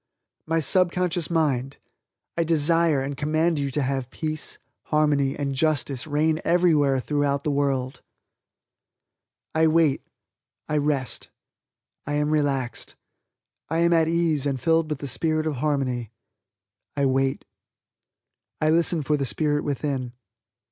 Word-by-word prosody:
"My 165 +1 +1
Subconscious 180 +1 +1
Mind, 140 -6 0 0.6
I 170 - +1
desire 165 -1 +2
and 140 +1 -4
command 155 +2 +1
you 140 -1 -1
to 145 +1 -1
have 135 -1 -2
peace, 155 +2 -3 0.3
harmony 145 -3 +1
and 140 -1 -2
justice 145 -2 0
reign 155 +1 +1
everywhere 155 -6 +3
throughout 140 +1 -1
the 150 - 0
world." 135 -2 -1 1.5
I 160 0 +3
wait 155 -3 +3 0.7
I 150 - 0
rest 145 -3 -2 0.8
I 145 - -2
am 150 +1 0
relaxed 140 -5 -1 0.7
I 165 - 0
am 170 0 +4
at 165 -1 +3
ease 165 -4 +1
and 135 -2 -1
filled 165 +2 +2
with 150 - -2
the 140 - -4
spirit 155 +4 +1
of 155 -4 -2
harmony. 130 -5 -1 0.9
I 140 - +2
wait. 135 0 0 1.1
I 155 0 +2
listen 165 -1 +2
for 150 +2 +1
the 140 - -1
spirit 145 +2 0
within. 135 -3 -3
150 Hz, 130 wpm, -24 LUFS, 140-160 Hz, 1.5 s, am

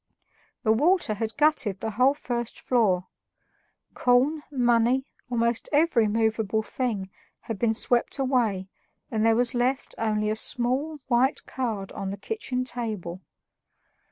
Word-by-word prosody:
The 220 - +3
water 310 - +3
had 220 +1 -4
gutted 280 -10 +2
the 220 - -3
whole 255 +6 +3
first 240 -5 -4
floor; 200 -8 +1 0.9
corn, 260 +5 +2
money, 245 -1 +2 0.2
almost 235 -1 0
every 290 -7 +3
movable 220 0 0
thing, 215 -7 -3 0.3
had 225 -4 -6
been 225 -2 +2
swept 240 +4 +1
away, 240 -8 0 0.4
and 220 -2 0
there 225 0 +4
was 240 0 +1
left 255 +2 -1
only 215 -1 0
a - - 0
small 255 +7 0
white 260 +2 +1
card 220 -7 -3
on 195 -1 -5
the 200 - -5
kitchen 255 - -3
table. 215 -8 -4
235 Hz, 130 wpm, -26 LUFS, 215-255 Hz, 0.9 s, there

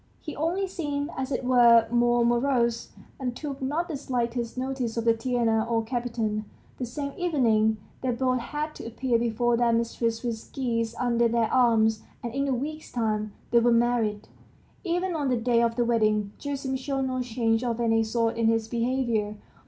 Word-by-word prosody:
He 305 - -7
only 340 +6 0
seemed, 295 -4 -3
as 265 +1 -3
it 265 - -1
were, 235 -2 +6
more 240 0 +3
morose, 235 -1 +1 0.3
and 250 -2 -3
took 280 0 -6
not 300 +6 -1
the 320 - -4
slightest 240 -3 -2
notice 255 -3 -2
of 230 - -1
Tatiana 230 -1 +2
or 225 -1 +1
Kapiton. 225 -3 -2 0.3
The 250 - -2
same 280 +3 -5
evening, 225 -11 +2 0.2
they 260 - -1
both 255 +1 +1
had 300 +5 -4
to - - -9
appear 235 +1 0
before 235 +1 +1
their 235 -1 +3
mistress 230 0 -1
with 230 -2 -4
geese 230 -3 -1
under 235 -1 +2
their 230 -1 0
arms, 220 -3 +3 0.2
and 235 -1 -4
in 275 +1 0
a - - 0
week's 305 +5 -5
time 215 -3 -1 0.2
they 235 - +6
were 240 +1 +3
married. 230 -3 +1 0.6
Even 355 0 -1
on 290 -4 0
the 250 - +2
day 235 0 +2
of 230 -1 +1
the 240 0 +1
wedding 215 -3 +1
Gerasim 275 -2 -3
showed 270 0 -2
no 255 -1 -1
change 230 -1 0
of 240 -1 -1
any 225 -1 +2
sort 230 +1 0
in 230 -1 +2
his 225 -1 +1
behavior. 235 -3 0
240 Hz, 180 wpm, -26 LUFS, 230-265 Hz, 0.6 s, were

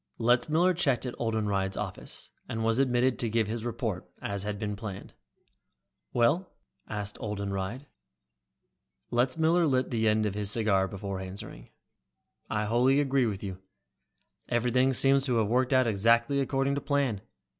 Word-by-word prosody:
Letzmiller 150 +10 +3
checked 135 -8 +1
at 125 - -3
Oldenreid's 105 -4 -1
office, - - -5 0.2
and 115 0 -2
was 115 +2 +2
admitted 125 -1 +2
to 115 - 0
give 110 0 +1
his 110 +2 -4
report, 115 -5 -3
as 100 -1 -3
had 105 +1 -3
been 105 0 -3
planned. 100 -2 -7 1.0
"Well?" 150 +11 +2 0.4
asked 105 -1 -5
Oldenreid. 100 +4 -3 1.3
Letzmiller 160 +8 +2
lit 130 -2 +1
the 110 -2 +1
end 110 0 +3
of 105 - -1
his 105 -1 -2
cigar 100 -3 +2
before 100 0 -5
answering. 95 - -8 0.8
"I 105 0 0
wholly 125 +5 +3
agree 135 -3 +2
with 100 -2 -4
you. 95 -2 -5 0.9
Everything 125 +2 +2
seems 135 +1 +3
to 125 - +1
have 110 -2 +2
worked 125 +3 +2
out 130 -1 +4
exactly 115 +6 +3
according 135 +1 0
to 140 - -2
plan. 135 -8 0
115 Hz, 145 wpm, -29 LUFS, 105-130 Hz, 1.3 s, out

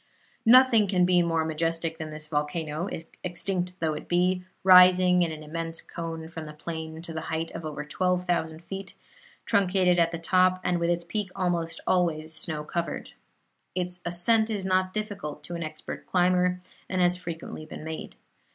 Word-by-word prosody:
Nothing 240 -3 +7
can 180 -2 +3
be 180 -1 +4
more 165 -2 +1
majestic 165 +1 -2
than 160 -1 -5
this 155 0 -7
volcano, 155 +3 -2 0.3
extinct 180 0 -2
though 160 -3 0
it - - -7
be, 180 +1 +2 0.2
rising 180 -1 +7
in 170 -2 +1
an 155 0 -7
immense 165 +1 -4
cone 165 -1 -6
from 160 -1 -7
the 150 - -9
plain 160 +1 -6
to 170 - -7
the 160 - -3
height 160 0 -3
of 165 - -7
over 150 -1 -5
twelve 180 +4 0
thousand 165 -2 -1
feet, 195 +1 -7 0.5
truncated 185 -2 +3
at 165 -1 +4
the 165 - -4
top, 185 +2 +3
and 175 -1 +1
with 170 0 +1
its 175 0 +1
peak 205 +2 -3
almost 175 -3 -1
always 160 -3 +1
snow 155 -1 -2
covered. 170 +2 -4 0.6
Its 180 0 -2
ascent 220 +6 +2
is 205 -4 -2
not 185 0 +2
difficult 200 -8 -5
to 175 - -7
an 170 - -4
expert 155 -1 -7
climber, 180 0 +2 0.3
and 185 - -1
has 180 0 +4
frequently 165 -3 -7
been - - -8
made. 160 0 -6
175 Hz, 175 wpm, -27 LUFS, 160-185 Hz, 0.6 s, Nothing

